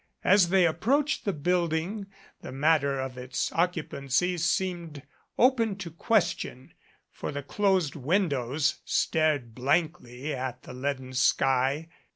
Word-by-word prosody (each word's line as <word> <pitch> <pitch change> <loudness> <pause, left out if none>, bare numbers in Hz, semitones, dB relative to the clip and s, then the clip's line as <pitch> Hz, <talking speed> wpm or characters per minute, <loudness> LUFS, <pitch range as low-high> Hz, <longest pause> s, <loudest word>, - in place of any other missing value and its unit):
As 185 -2 +5
they 190 -1 +4
approached 265 - +1
the 200 - +1
building 175 +4 -1 0.3
the - - -8
matter 140 0 +2
of 130 -1 -5
its 130 +2 -3
occupancy 170 -1 0
seemed 170 -3 -2 0.3
open 235 -5 +3
to 185 -4 -7
ques 205 +5 +2
tion, 130 +1 -8 0.4
for - - -5
the 145 0 -5
closed 190 -1 +1
windows 145 - 0
stared 150 -7 +1
blankly 140 0 -1
at 130 -1 -5
the - - -10
leaden 130 0 -4
sky. 135 +3 +2
155 Hz, 125 wpm, -27 LUFS, 135-180 Hz, 0.4 s, As